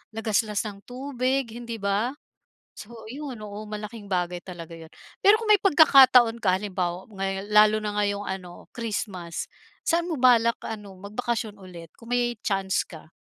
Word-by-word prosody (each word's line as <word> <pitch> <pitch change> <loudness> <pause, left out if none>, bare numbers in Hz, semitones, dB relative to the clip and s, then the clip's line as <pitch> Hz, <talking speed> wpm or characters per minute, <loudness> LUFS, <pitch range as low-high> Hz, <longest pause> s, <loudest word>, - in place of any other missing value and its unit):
lagaslas 215 -1 0
ng 205 -2 -7
tubig, 260 +1 -1
hindi 235 0 -6
ba? 210 +5 -1 0.6
So 215 - -11 0.2
ayun, 270 0 -7
oo 210 0 -7
malaking 210 0 -7
bagay 180 -1 -1
talaga 170 -3 -9
yun. 160 -1 -12 0.3
Pero 410 +2 +6
kung 450 - -5
may 420 -2 +5
pagkakataon 260 - +6
ka 185 -2 +3
halimbawa 185 -3 -3
ngayon 195 -2 -4
lalo 210 0 +7
na 210 -1 -4
ngayong 205 0 -1
ano 185 -2 -7
Christmas, 200 -7 -4 0.4
saan 340 +1 +1
mo 315 - -2
balak 235 -2 +4
ano, 205 -4 -8
magbakasyon 215 +2 -3
ulit 180 -4 -11
kung 230 0 -14
may 245 -1 +1
chance 195 -1 0
ka? 160 -2 -13
210 Hz, 155 wpm, -25 LUFS, 195-240 Hz, 0.6 s, lalo